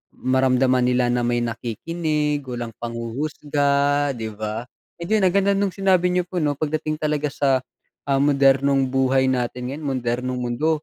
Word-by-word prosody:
maramdaman 130 0 +2
nila 125 0 +2
na 120 0 0
may 120 0 +1
nakikinig, 150 +6 -2
walang 120 -2 -5
panghuhusga 140 +4 0
'di 110 -2 -5
ba? 110 +2 -4 0.4
Ayun 205 +4 +1
ang 175 - 0
ganda 200 0 +3
nung 200 -1 0
sinabi 190 -2 +2
niyo 180 0 +1
po 180 - -3
'no 145 - +2
pag 155 - -2
dating 155 0 -1
talaga 150 -1 0
sa, 135 -2 +2 0.5
ah, 135 -1 +2
modernong 140 -1 +3
buhay 130 0 +2
natin 125 0 -2
ngayon 150 +3 -7
modernong 125 +1 -2
mundo 125 +6 -1
135 Hz, 155 wpm, -22 LUFS, 125-150 Hz, 0.5 s, ganda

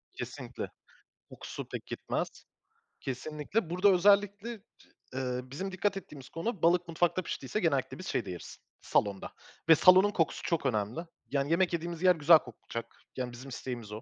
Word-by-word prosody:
Kesinlikle, - - -6 0.6
kokusu - - -7
pek - - -6
gitmez. - - -2 0.7
Kesinlikle. 150 - -3
Burada 180 +4 +4
özellikle, 200 +3 +4 0.6
eee, 125 -1 -2
bizim 145 +10 -5
dikkat 195 +2 0
ettiğimiz 140 -8 -10
konu, 185 +3 -3
balık 175 +1 +4
mutfakta 175 +2 +1
piştiyse 165 +3 -3
genellikle 150 - 0
biz 185 - -7
şeyde 100 -6 -1
yeriz 90 - -8 0.2
salonda 100 -2 0 0.4
ve 160 - +10
salonun 185 +5 +7
kokusu 165 -6 0
çok 165 -5 0
önemli. 110 +1 0 0.3
Yani 140 +2 0
yemek 175 +1 +3
yediğimiz 170 +1 -3
yer 180 -1 +6
güzel 160 +1 +7
kokacak. 115 -2 -8 0.2
Yani 125 -1 -2
bizim 130 +3 -9
isteğimiz 120 -4 -6
o. 105 +2 -6
160 Hz, 150 wpm, -31 LUFS, 130-185 Hz, 0.7 s, ve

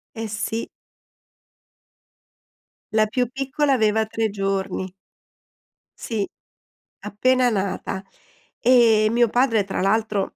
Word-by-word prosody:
Eh, 225 0 -4
sì. 220 +2 -3 2.3
La 215 -1 +4
più 250 +3 0
piccola 275 +2 0
aveva 220 -2 +2
3 220 0 -2
giorni. 195 -2 -3 1.0
Sì, 215 -4 -3 0.7
appena 250 +5 +1
nata. 195 -2 -3 0.6
E 230 -3 +5
mio 240 +1 +3
padre 240 -3 +2
tra 195 0 -4
l'altro 210 0 0
220 Hz, 95 wpm, -22 LUFS, 200-240 Hz, 2.3 s, E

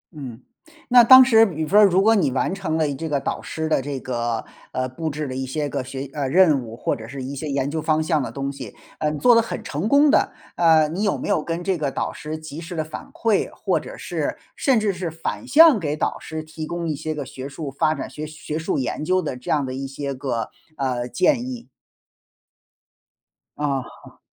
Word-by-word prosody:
嗯， 130 -5 -8 0.5
那 245 -1 +8
当 260 +2 +10
时 225 -3 +6
比方 180 +3 +3
如 190 -2 +5
果 220 +2 +5
你 185 -10 +2
完 130 - 0
成 190 -5 -2
了 155 -2 +2
一 145 - -2
这 160 +4 -5
个 145 -2 +1
导 - - -3
师 160 0 -4
的 155 - +2
这 135 0 -4
个， 120 -3 -2 0.3
呃， 130 0 -1
布 160 +6 -4
置 150 +1 -4
了 130 - -5
一 130 - -2
些 145 +3 -2
个 135 - -3
学 135 +1 -6
呃， 145 -3 -2
任 155 -2 +4
务， 115 -1 -9
或 - - -1
者 110 -1 -9
是 130 +2 -7
一 135 +2 -5
些 145 +3 -5
研 140 -1 -1
究 160 0 -2
方 155 0 +1
向 155 -1 +1
的 130 - -4
东 140 0 -3
西， 130 -6 -9 0.2
呃， 155 - +1
你 150 - -3
做 245 +9 +5
得 230 - +6
很 230 - -5
成 155 +9 -3
功 285 +3 +5
的， - - +3 0.2
呃， 160 -2 +5
你 175 +6 -3
有 205 - +1
没 - - -5
有 200 -6 +2
跟 170 +2 -3
这 190 0 0
个 145 -2 0
导 - - -3
师 155 +1 -6
及 155 0 -8
时 175 +1 -7
地 155 - -1
反 155 - -9
馈， 225 -3 +1
或 - - 0
者 - - -10
是 - - -3 0.2
甚 265 -5 +2
至 210 -2 0
是 180 -1 -4
反 165 +10 -5
向 305 -3 +7
给 150 -4 -2
导 - - -1
师 160 0 -6
提 155 0 -7
供 170 0 -3
一 155 - -1
些 155 +2 -4
个 145 -2 -4
学 130 +2 -8
术 140 0 -6
发 155 +3 +1
展、 - - -5
学 155 +1 -7
学 155 0 -5
术 160 - -1
研 135 +3 -2
究 185 +4 +2
的 180 - -3
这 125 - -10
样 145 -3 +2
的 130 - -5
一 135 +1 -4
些 140 +1 -4
个， 130 -4 -3 0.3
呃， 125 -3 -1
建 240 - +2
议？ 245 -2 -7 1.9
啊。 140 -4 -4
155 Hz, 250 characters per minute, -22 LUFS, 135-180 Hz, 1.9 s, 当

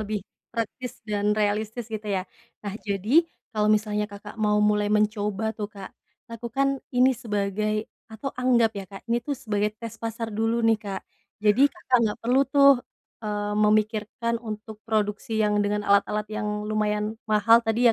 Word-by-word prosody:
lebih 210 -1 -3 0.2
praktis 230 +3 -5
dan 210 0 0
realistis, 215 +2 0
gitu, 215 -1 -4
ya. 190 -2 0 0.4
Nah, 200 - -3
jadi 205 - +3 0.3
kalau 210 -1 +1
misalnya 210 -1 +1
Kakak 205 +2 -10
mau 210 -1 +3
mulai 210 0 +2
mencoba 210 0 +1
tuh, 210 -2 -5
Kak, 200 -2 -10 0.3
lakukan 255 +4 -1
ini 255 +1 +4
sebagai 215 -2 -1 0.2
atau 225 +5 -6
anggap 245 -2 +3
ya, 200 -2 -6
Kak, 195 0 -11
ini 240 - +2
tuh 280 +4 -3
sebagai 210 -2 -1
tes 230 0 -7
pasar 225 0 -4
dulu 225 +2 0
nih, 225 -1 +4
Kak. 200 -3 -5 0.4
Jadi 240 +7 +5
Kakak 285 -6 0
nggak 210 -2 0
perlu 250 +3 +4
tuh, 280 -2 +6 0.4
eee, 210 -1 -2
memikirkan 215 +2 +1
untuk 215 -1 -7
produksi 215 +1 -1
yang 210 -1 +2
dengan 205 0 0
alat-alat 200 +1 +2
yang 210 -1 -2
lumayan 210 +1 -1
mahal 215 +2 +6
tadi 230 +1 +3
215 Hz, 155 wpm, -25 LUFS, 210-230 Hz, 0.4 s, tuh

